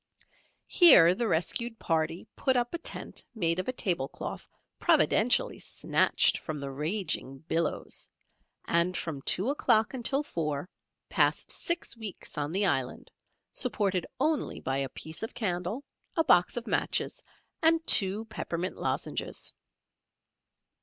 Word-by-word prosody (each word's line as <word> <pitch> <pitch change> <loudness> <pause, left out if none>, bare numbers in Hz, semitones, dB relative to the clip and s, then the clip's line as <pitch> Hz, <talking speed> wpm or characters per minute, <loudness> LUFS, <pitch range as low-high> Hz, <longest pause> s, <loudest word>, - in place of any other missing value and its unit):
Here 180 - +8
the 230 +5 -2
rescued 225 +7 -1
party 165 -1 -1
put 260 - +1
up 240 0 -1
a 340 - -3
tent - - -3
made 170 -4 0
of 185 - -3
a - - +1
table 175 - -1
cloth - - -7 0.3
providentially - - +3
snatched - - +1
from 155 - -5
the 140 -1 -5
raging 150 -2 -2
billows, 165 -2 -2 0.6
and 170 +2 +1
from 150 -5 -4
two 195 - +2
o'clock 220 -6 +2
until 265 +3 0
four, 150 - -3 0.4
passed - - +1
six 340 -7 -1
weeks 220 -5 -6
on 145 -2 -2
the 195 +5 +1
island 130 -8 -2 0.4
supported 200 -7 -1
only 305 +2 0
by 135 +1 -2
a 135 -1 -2
piece 160 +4 -8
of 225 - -6
candle, 190 +4 -2 0.3
a 325 - +3
box 180 - +3
of 240 - -3
matches, - - -1 0.4
and 325 0 +3
two 200 +3 +3
peppermint 180 -5 -4
lozenges. - - -3
185 Hz, 135 wpm, -29 LUFS, 160-240 Hz, 0.6 s, Here